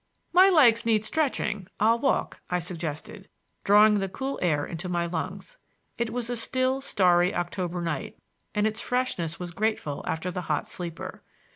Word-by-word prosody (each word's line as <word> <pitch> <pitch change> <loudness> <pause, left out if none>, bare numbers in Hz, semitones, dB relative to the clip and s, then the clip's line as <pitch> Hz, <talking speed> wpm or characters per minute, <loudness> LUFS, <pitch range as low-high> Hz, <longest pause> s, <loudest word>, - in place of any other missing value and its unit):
"My 370 +2 +8
legs 240 -10 +5
need 220 -2 +2
stretching; 215 - -1
I'll 225 +2 +4
walk," 270 +2 0
I 180 - +1
suggested, 175 +2 -6 0.3
drawing 210 +1 +6
the 195 -1 -2
cool 270 +7 -4
air 150 -5 +1
into 175 +2 -6
my 175 -1 0
lungs. 185 - -5 0.4
It 235 -1 0
was 240 0 -3
a 245 - -2
still, 255 +3 0
starry 180 -6 +3
October 175 0 -2
night, 165 - -4 0.4
and 210 0 +2
its 220 +1 -1
freshness 220 -10 -1
was 175 -1 -5
grateful 195 -7 -2
after 170 +3 -2
the 180 - -4
hot 150 - 0
sleeper. 170 -2 -7
200 Hz, 160 wpm, -27 LUFS, 175-230 Hz, 0.4 s, My